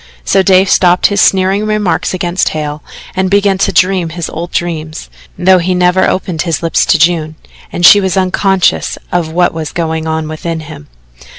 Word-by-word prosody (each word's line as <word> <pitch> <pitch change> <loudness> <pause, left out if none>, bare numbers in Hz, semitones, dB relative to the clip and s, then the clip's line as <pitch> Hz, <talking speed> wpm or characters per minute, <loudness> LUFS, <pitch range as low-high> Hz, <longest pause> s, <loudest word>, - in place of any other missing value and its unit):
So 195 - +2
Dave 190 0 +3
stopped 180 -1 +2
his 200 -1 +2
sneering 195 +2 +2
remarks 215 -3 -1
against 180 0 -1
Hale 150 -1 -5 0.3
and 190 0 0
began 200 -1 +1
to - - +1
dream 185 -2 +1
his 170 0 -6
old 170 +2 -6
dreams, 160 -2 -4 0.3
though 185 +1 +4
he 180 +1 -1
never 180 +1 +2
opened 180 -4 -3
his 165 -1 -2
lips 165 - +1
to - - +3
June, 160 -1 +1 0.4
and 175 - 0
she 205 - +7
was 190 0 -1
unconscious 190 0 0
of 170 -3 -1
what 175 +1 +1
was 160 -2 -5
going 160 -1 -3
on 160 0 -2
within 160 +1 -5
him. 75 - -11
175 Hz, 180 wpm, -12 LUFS, 160-190 Hz, 0.4 s, she